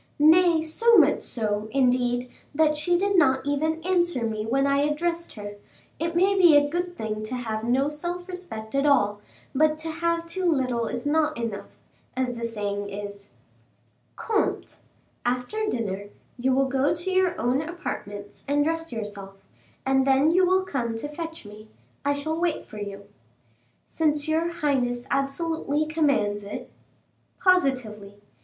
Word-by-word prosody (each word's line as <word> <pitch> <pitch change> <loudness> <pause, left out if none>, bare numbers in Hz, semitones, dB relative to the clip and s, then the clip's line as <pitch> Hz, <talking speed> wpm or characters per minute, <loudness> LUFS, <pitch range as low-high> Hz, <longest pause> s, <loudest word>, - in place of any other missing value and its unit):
"Nay, 320 +2 +5
so 455 +9 +4
much 300 -4 +5
so, 210 -2 -1
indeed, 245 -1 +1 0.3
that 305 0 +3
she 345 +4 +2
did 400 +2 +1
not 265 -7 +3
even 310 +3 0
answer 345 -8 +1
me 215 -1 -3
when 270 +4 +2
I 280 0 +2
addressed 335 +4 -1
her; 205 -1 -8 0.4
it 335 +1 -2
may 380 +3 +4
be 350 -6 +7
a 290 0 +3
good 350 +3 -3
thing 215 -1 -3
to 215 +4 -4
have 220 -3 -3
no 260 +4 +2
self 350 +4 -5
respect 355 -13 -7
at 275 +1 +2
all, 205 -7 +3 0.3
but 305 +2 +3
to 320 +1 -4
have 335 +1 -1
too 355 +1 0
little 250 -5 0
is 245 +2 -4
not 310 +1 +1
enough, 230 -4 -5 0.4
as 255 -1 0
the 235 -1 -7
saying 205 -3 -3
is." 200 0 -7 0.9
"Comte! 440 -2 -1 0.5
after 250 - -1
dinner, 205 - -3 0.3
you 255 +2 0
will 270 +1 +3
go 270 +4 +1
to 350 +3 -3
your 370 -1 +2
own 245 +5 +1
apartments 205 - -6
and 290 +1 +2
dress 325 +1 -2
yourself, 205 -4 -6 0.5
and 265 0 +2
then 270 +4 +4
you 370 +2 +4
will 375 +1 +3
come 245 -10 -2
to 225 +6 -4
fetch 325 -1 -7
me. 210 +1 -12 0.4
I 285 +1 +2
shall 315 +3 -3
wait 345 -3 0
for 215 - -10
you." 200 -1 -7 0.8
"Since 300 -2 0
your 320 +2 +1
highness 260 -7 -1
absolutely 295 +2 0
commands 280 -10 +1
it." 200 - -7 0.7
"Positively." 255 - +1
280 Hz, 155 wpm, -25 LUFS, 230-330 Hz, 0.9 s, be